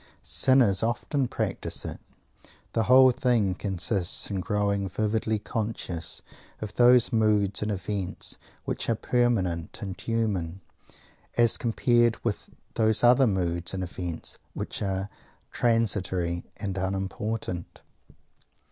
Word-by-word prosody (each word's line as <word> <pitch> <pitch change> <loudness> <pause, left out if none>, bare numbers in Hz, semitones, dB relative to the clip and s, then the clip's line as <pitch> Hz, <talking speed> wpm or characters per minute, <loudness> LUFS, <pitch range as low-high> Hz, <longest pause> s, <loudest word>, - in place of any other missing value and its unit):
Sinners 100 - +4
often 125 +4 0
practise - - -2
it. - - -6 0.7
The 115 - +1
whole 130 0 +7
thing 120 -6 +1
consists 95 0 0
in 100 - -1
growing 100 0 0
vividly 110 +2 0
conscious 105 -6 -3 0.4
of 105 -1 -6
those 125 0 +5
moods 105 -3 +2
and 105 - -1
events 95 -1 -3 0.3
which - - -2
are 115 - +3
permanent 105 -9 0
and 95 -2 -6
human, 100 -6 -2 0.8
as 120 -2 +6
compared 120 0 +2
with 110 -4 -2 0.2
those 110 0 +2
other 125 +2 +6
moods 85 -3 -1
and 95 - -3
events 90 -2 -5 0.2
which - - -4
are 95 -1 -2 0.4
transitory 95 -7 0
and 100 -2 -3
unimportant. 95 0 -4
105 Hz, 110 wpm, -27 LUFS, 95-115 Hz, 0.8 s, whole